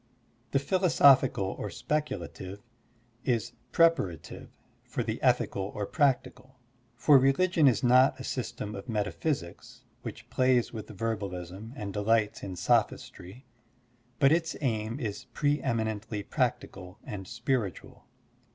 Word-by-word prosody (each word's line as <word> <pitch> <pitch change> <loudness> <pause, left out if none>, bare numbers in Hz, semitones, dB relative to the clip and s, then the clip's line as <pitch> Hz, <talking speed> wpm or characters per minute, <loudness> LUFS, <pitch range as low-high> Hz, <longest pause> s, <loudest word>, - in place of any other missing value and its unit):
The - - +1
philosophical 140 - +4
or 105 - -3
speculative 100 - -4 0.6
is 120 -2 0 0.2
preparative 165 - +1 0.3
for - - -3
the - - -4
ethical 95 - +1
or 105 - -2
practical, 130 -1 0 0.4
for 135 +3 +6
religion 155 +4 +3
is 125 -2 +2
not 130 +2 +5
a - - -6
system 110 -5 -4
of 100 +5 -8
metaphysics 105 - -3 0.2
which - - -8
plays 130 -2 +2
with 110 -2 -6
verbalism 100 -1 -5
and 100 -6 -5
delights 105 +1 +1
in 95 -2 -6
sophistry, 105 +1 -1 0.7
but 135 +4 +5
its 165 0 +1
aim 115 -2 -1
is 105 -6 -4
pre 145 -1 +1
eminently 110 -2 -2
practical 90 0 -3
and 95 -3 -7
spir 120 -1 0
itual. - - -15
115 Hz, 120 wpm, -29 LUFS, 100-135 Hz, 0.7 s, for